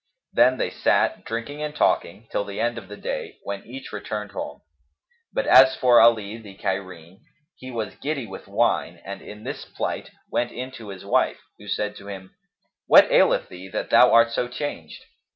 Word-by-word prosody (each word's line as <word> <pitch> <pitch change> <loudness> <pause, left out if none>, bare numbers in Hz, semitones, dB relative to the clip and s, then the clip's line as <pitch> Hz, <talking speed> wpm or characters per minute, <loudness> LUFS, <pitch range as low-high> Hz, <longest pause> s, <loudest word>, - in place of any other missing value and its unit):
Then 130 +1 +5
they - - -1
sat, - - +1
drinking 120 +6 -5
and 150 0 -4
talking, 100 - 0
till - - 0
the 100 0 -7
end 120 0 0
of 100 - -15
the 105 +1 -9
day, - - -5
when 100 0 -5
each 130 +3 -9
returned 105 -1 -5
home. - - -6 0.7
But - - -1
as 130 0 +7
for 125 -2 +6
Ali, 110 -2 +3
the 100 -3 -12
Cairene, 95 -2 -5 0.4
he 130 - -10
was 115 -5 -4
giddy 145 -4 -3
with 95 -3 -10
wine - - 0
and 100 +1 -7
in 105 +1 -11
this - - -5
plight - - -4 0.2
went 120 0 0
in 130 +1 -6
to 115 -5 -10
his 95 -1 -9
wife, - - +1 0.2
who 105 - -13
said 105 +1 -2
to 100 - -12
him, 95 -2 -9 0.5
"What - - +7
aileth - - +4
thee 90 +1 -10
that 105 - -4
thou 125 - +7
art 115 0 +6
so 120 - -1
changed?" 125 - -6
110 Hz, 190 wpm, -24 LUFS, 100-125 Hz, 0.7 s, as